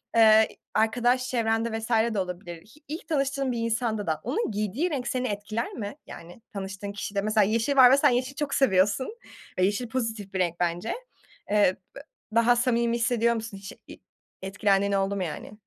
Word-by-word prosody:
eee, 220 -1 +7
i - - -18 0.2
arkadaş 245 +3 +2
çevrende 225 -1 0
vs. 220 - -7 0.2
de 205 - -1
olabilir. 180 -1 -5
Hi 230 +8 -20
ilk 315 +5 -7
tanıştığın 275 -3 0
bir 240 - -3
insanda 225 -3 -1
da 155 -1 -1
onun 275 - -1
giydiği 215 - -1
renk 275 -6 -3
seni 255 0 -1
etkiler 215 +2 -3
mi? 205 +2 -6
Yani, 175 +6 -11
tanıştığın 195 0 -5
kişide, 200 -1 -3
mesela, 215 0 +3
yeşil 225 +7 +1
var 255 -2 +8
ve 275 - +6
sen 290 0 +5
yeşil 255 +2 -1
çok 285 -1 -3
seviyorsun 235 - +2 0.4
ve - - +3
yeşil 210 +5 -1
pozitif 225 -5 -3
bir 190 - -2
renk, 175 -1 0
bence. 175 +4 -1 0.6
Eee, 205 -3 +4 0.2
b - - -8 0.4
daha 235 +1 +5
samimi 235 -1 +1
hissediyor 235 0 +2
musun 220 -3 -6
hiç 195 +1 -9 0.2
i - - -11 0.4
etkilendiğin 195 +1 +1
oldu 195 0 0
mu, 190 - -2
yani? 160 +4 -6
220 Hz, 185 wpm, -26 LUFS, 200-245 Hz, 0.6 s, var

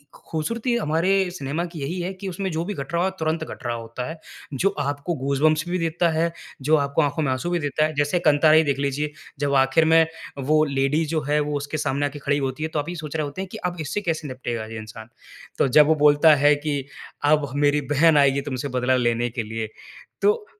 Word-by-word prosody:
खूबसूरती 230 +10 -2
हमारे 165 -2 0 0.2
सिनेमा 150 0 -3
की 170 -2 -9
यही 175 +6 -3
है 180 - -3
कि 190 +1 -8
उसमें 190 +1 -3
जो 160 +1 -2
भी 205 - -3
घट 140 0 -7
रहा 170 +1 +2
हो 190 - +2
तुरंत 160 0 -1
घट 145 - -9
रहा 120 0 -1
होता 115 +2 -6
है। 160 - -7 0.4
जो 190 +9 +2
आपको 145 +4 -2
गूजबम्पस 150 +3 +1
भी 180 - 0
देता 165 +1 +1
है, 165 +1 +1 0.3
जो 150 +4 +3
आपको 140 +2 +1
आँखों 145 +2 -1
में 135 - 0
आँसू 130 +7 -3
भी 175 - +1
देता 155 +1 0
है। 155 - -3
जैसे 145 +4 +1
कंटारा 155 +1 +5
ही 160 - +6
देख 140 -2 0
लीजिए 140 +2 -1 0.3
जब 140 -1 0
आखिर 135 +4 +4
में 160 0 +5 0.4
वो 155 0 +5
लेडी 140 +3 +1
जो 155 - +1
है 150 +1 +3
वो 150 0 -2
उसके 145 +2 -4
सामने 140 0 0
आके 145 +1 -8
खड़ी 140 +1 0
होती 135 +2 -3
है 160 - -2
तो 155 - -2
आप 145 +3 -4
यही 175 - -5
सोच 155 -2 -7
रहे 155 -1 0
होते 145 +6 -6
हैं 195 - -5
कि - - -6
अब 175 - -10
इससे 180 +8 -3
कैसे 160 -4 -2
निपटेगा 120 -3 -4
ये 110 0 -8
इंसान। 110 +1 -10 0.5
तो - - +4
जब 150 +3 +6
वो 160 - +4
बोलता 150 +1 +6
है 145 +1 +4
कि 145 -2 0 0.5
"अब 150 -2 +2
मेरी 145 0 +2
बहन 160 +2 +5
आएगी 140 -1 +4
तुमसे 130 +1 -3
बदला 130 +1 +2
लेने 120 -1 +1
के 120 0 -4
लिए" 110 0 -5 0.5
तो 425 +1 +2
150 Hz, 235 wpm, -23 LUFS, 135-160 Hz, 0.5 s, ही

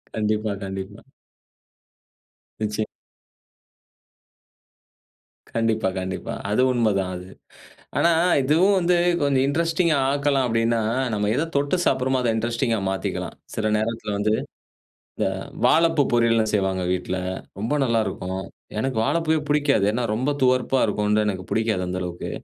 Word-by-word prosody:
கண்டிப்பா, 110 0 0
கண்டிப்பா. 95 +2 -6 1.6
நிச்சியம். 105 0 -1 2.7
கண்டிப்பா, 115 -2 +1
கண்டிப்பா. 95 0 -4 0.2
அது 105 - +2
உண்மதான் 105 -6 +1
அது. 90 0 -9 0.7
ஆனா, 170 - +4 0.3
இதுவும் 165 +9 +3
வந்து 175 0 +2 0.3
கொஞ்சம் 140 -2 +2
இன்ட்ரஸ்டிங்கா 165 +1 +1
ஆக்கலாம் 140 -2 +1
அப்டின்னா, 115 0 +1 0.3
நம்ம 105 -1 0
எத 145 - +1
தொட்டு 145 +5 +1
சாப்ட்றோமோ 130 0 +2
அத 120 -2 +1
இன்ட்ரஸ்டிங்கா 115 0 0
மாத்திக்கலாம். 95 0 -3 0.2
சில 110 -1 0
நேரத்துல 110 0 -2
வந்து, 105 +1 +1 0.8
இந்த - - +1 0.4
வாழைப்பூ 165 -2 +4
பொரியல்லலாம் 115 -2 +3
செய்வாங்க 95 -2 0
வீட்ல 90 0 -2 0.4
ரொம்ப 110 +7 -1
நல்லாருக்கும். 95 -6 -1 0.4
எனக்கு 130 0 -1
வாழைப்பூவே 160 +1 +1
புடிக்காது. 145 -8 +3
ஏன்னா 120 +3 -1
ரொம்ப 130 +6 0
துவர்ப்பா 130 0 +3
இருக்கும்னு 105 0 +1
தான் 105 0 +2
எனக்கு 95 -2 -4
புடிக்காது 110 -4 0
அந்த 90 +1 -3
அளவுக்கு. 90 -1 -5
115 Hz, 120 wpm, -23 LUFS, 105-135 Hz, 2.7 s, ஆனா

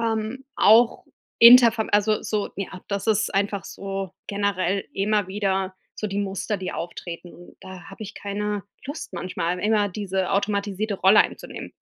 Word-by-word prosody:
Ähm, 225 +3 -2
auch 225 +3 +5 0.4
inter 235 0 +10
vom 220 -1 -3
also, 210 +1 +2
so, 210 -2 -2
ja, 190 -2 -6
das 200 0 -3
ist 215 -1 +1
einfach 200 0 0
so 195 -2 -6
generell 200 -1 -1
immer 205 -1 0
wieder 195 -1 -1 0.2
so 215 - -4
die 195 0 -3
Muster 200 +1 -2
die 185 -1 -5
auftreten. 175 0 -7
Und 175 - -15
da 185 -1 -11
hab 195 - -13
ich 210 -1 -7
keine 205 0 -3 0.2
Lust 285 -4 -7
manchmal, 180 -1 -3
immer 210 0 +2
diese 190 -1 -3
automatisierte 200 +1 -1
Rolle 195 +2 +6
einzunehmen. - - -4
200 Hz, 155 wpm, -24 LUFS, 190-215 Hz, 0.4 s, inter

